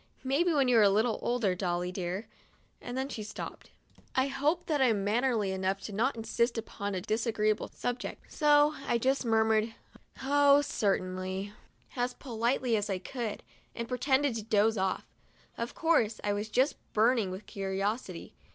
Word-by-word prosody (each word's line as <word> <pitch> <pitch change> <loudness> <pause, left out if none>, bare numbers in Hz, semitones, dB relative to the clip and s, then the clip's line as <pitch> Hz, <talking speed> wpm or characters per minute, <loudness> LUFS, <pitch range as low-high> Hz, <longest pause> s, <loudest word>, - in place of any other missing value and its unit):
Maybe 285 +7 +2
when 280 -4 +3
you 245 -2 +5
are - - +6
a 205 - +6
little 220 +3 +2
older, 235 -6 +1
Dolly 180 -1 -1
dear" 185 +3 -4 0.3
— - - -38
and 245 +1 -5
then 265 +1 -1
she 250 -5 -6
stopped. 210 0 -7 0.5
I 260 +1 +2
hope 295 +6 0
that 295 -3 0
I - - +6
am 215 -5 +2
mannerly 220 -1 +1
enough 190 +1 -2
not 230 +7 +1
to 225 - -5
insist 235 +1 0
upon 205 -3 -4
a 185 - -2
disagreeable 215 0 0
subject; 245 0 -5
so 295 0 +5
I 235 - +2
just 265 +3 +1
murmured: 220 0 +2 0.5
"Oh, 285 +1 +5
cer 205 -7 +1
tainly," 185 +2 -4 0.4
as 245 0 -1
politely 240 -1 0
as 210 0 -1
I 195 - 0
could, 220 +3 -5 0.3
and 235 0 -4
pretended 265 +2 +1
to - - -3
doze 220 +1 +3
off. 190 -2 -1 0.5
Of 235 +1 -4
course, 305 -10 +2
I 205 - +1
was 205 +2 -3
just 260 +6 +2 0.2
burning 225 -2 +3
with 190 +3 -7
curiosity. 195 +4 -3
225 Hz, 170 wpm, -30 LUFS, 205-260 Hz, 0.5 s, are